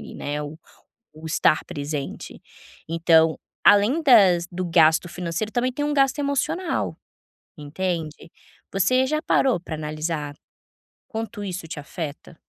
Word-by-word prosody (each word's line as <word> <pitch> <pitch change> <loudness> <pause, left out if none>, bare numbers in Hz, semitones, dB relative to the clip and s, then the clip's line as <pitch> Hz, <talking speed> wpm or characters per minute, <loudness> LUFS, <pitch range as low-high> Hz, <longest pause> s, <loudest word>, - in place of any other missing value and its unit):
né, 145 +1 -4
o 150 +2 -8 0.6
o 155 +1 -12
estar 160 -1 +2
presente, 145 -1 -6 0.5
então, 165 -1 +3 0.3
além 225 +11 +5
das 190 - +5
do 185 +1 -3
gasto 165 0 +4
financeiro 180 +5 -4
também 245 +1 0
tem 290 - -3
um 295 - -1
gasto 270 0 +2
emocional, 285 +5 -1 0.6
entende. 160 +1 -4 0.4
Você 255 +7 +3
já 305 +2 -1
parou 260 - +2
pra 165 -2 -6
analisar 155 -1 -4 0.7
quanto 225 -1 -5
isso 185 -3 -5
te 155 - -6
afeta? 155 +1 -8
175 Hz, 125 wpm, -23 LUFS, 155-230 Hz, 0.7 s, além